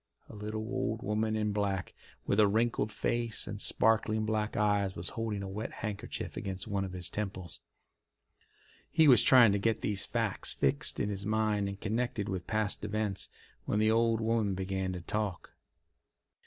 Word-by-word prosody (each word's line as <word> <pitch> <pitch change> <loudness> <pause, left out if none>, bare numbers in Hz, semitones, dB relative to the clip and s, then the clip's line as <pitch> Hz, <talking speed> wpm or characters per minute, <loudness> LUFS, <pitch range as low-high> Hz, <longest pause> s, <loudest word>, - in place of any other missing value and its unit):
A - - -10
little 110 +1 -4
old 115 -2 -2
woman 110 -1 0
in 105 -1 0
black, 100 -2 -1 0.3
with 100 - +1
a 105 - +7
wrinkled 110 0 +1
face 115 0 -1
and 105 -1 -6
sparkling 110 -1 +2
black 110 0 -1
eyes, 105 -3 +1
was 85 +1 -4
holding 110 -3 -3
a - - -5
wet 105 +3 -5
handkerchief 105 -2 -5
against 95 0 -4
one 100 -2 -1
of 95 -1 -5
his 90 -1 -1
temples. 95 -4 -5 1.3
He 160 - +4
was 130 -4 +8
trying 125 -5 +7
to 100 - +1
get 110 +2 0
these 100 -2 0
facts - - +1
fixed 140 +1 +1
in 105 - 0
his 100 0 -3
mind 105 -2 +1
and 100 0 -7
connected 110 -1 -2
with 90 -2 -4
past 110 -2 -1
events, 105 -2 -2 0.4
when - - 0
the 110 +1 +3
old 115 0 +2
woman 110 -3 +1
began 95 0 -2
to 90 - -5
talk. 105 0 -3
105 Hz, 170 wpm, -31 LUFS, 100-110 Hz, 1.3 s, was